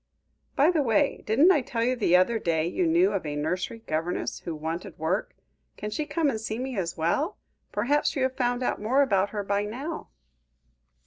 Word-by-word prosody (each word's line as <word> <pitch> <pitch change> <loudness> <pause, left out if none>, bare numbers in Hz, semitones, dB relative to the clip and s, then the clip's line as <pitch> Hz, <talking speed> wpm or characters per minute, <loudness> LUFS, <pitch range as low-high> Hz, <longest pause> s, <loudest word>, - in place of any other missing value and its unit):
"By 295 +5 +5
the 325 -4 +2
way, 225 -6 +1
didn't 305 - +5
you 295 - +2
tell 230 -2 -2
me 250 - +2
the 215 -8 +2
other 225 +5 +2
day 160 -4 0
you 335 - 0
knew 345 +4 +4
of - - -1
a 150 -2 -4
nursery 180 +9 -3
governess 160 +3 -2
who 170 - -5
wanted 165 +4 -5
work? 165 +6 -1 0.4
Can 210 - -5
she 300 +8 -2
come 320 0 +1
and 225 -6 -1
see 220 0 -3
me 260 +1 -4
as 175 -4 -3
well? 225 - 0 0.3
Perhaps 280 +10 +1
you 270 - 0
have 260 0 0
found 245 0 0
out - - -1
more 260 +7 +3
about 200 -6 +2
her 205 -2 -3
by 200 +1 0
now?" 265 +10 -5
220 Hz, 200 wpm, -27 LUFS, 180-275 Hz, 0.4 s, By